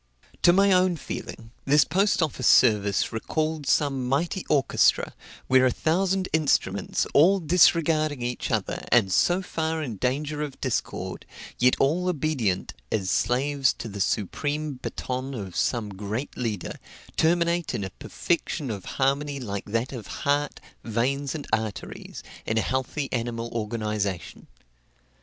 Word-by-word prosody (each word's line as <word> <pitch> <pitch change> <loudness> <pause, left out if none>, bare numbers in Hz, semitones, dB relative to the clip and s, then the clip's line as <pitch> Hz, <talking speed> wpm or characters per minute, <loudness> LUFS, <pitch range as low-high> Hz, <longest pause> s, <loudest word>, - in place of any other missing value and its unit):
To 175 - +7
my 195 +2 +4
own 185 -2 +3
feeling, 115 -5 -7
this 145 +2 +4
post 195 -2 +2
office 135 -5 -1
service 105 -5 +4
recalled 155 +5 -2
some 135 -4 +1
mighty 170 +7 0
orchestra, 140 -4 +3 0.3
where 130 0 +5
a - - +3
thousand 185 +7 0
instruments, 155 -3 +1
all 185 +7 +6
disregarding 155 -4 +3
each 120 0 -3
other, - - -1
and 110 -6 +4
so 175 - +3
far 160 -2 -2
in 120 -8 -5
danger 145 +6 -1
of 145 -3 -5
discord, - - -3 0.3
yet 125 +1 +5
all 165 +7 +2
obedient 140 - -1 0.2
as 95 -3 0
slaves 135 +2 +2
to - - -7
the 100 -2 -5
supreme 145 - -1
baton 130 +1 -4
of 95 -6 -6
some 115 -4 0
great 105 +7 -5
leader, 110 -6 -4 0.4
terminate 170 0 +1
in 100 - -2
a 95 - -5
perfection 155 - -2
of 100 -3 -6
harmony 140 +1 +1
like 100 -6 -4
that 115 +5 -2
of 120 -5 -7 0.2
heart, 145 +1 +1 0.2
veins, 130 +6 -1
and 150 - -5
arteries, 110 -2 -4 0.2
in 110 - 0
a - - +4
healthy 130 +3 -2
animal 115 -1 -2
organization. 105 -4 -3
135 Hz, 140 wpm, -26 LUFS, 115-155 Hz, 0.4 s, To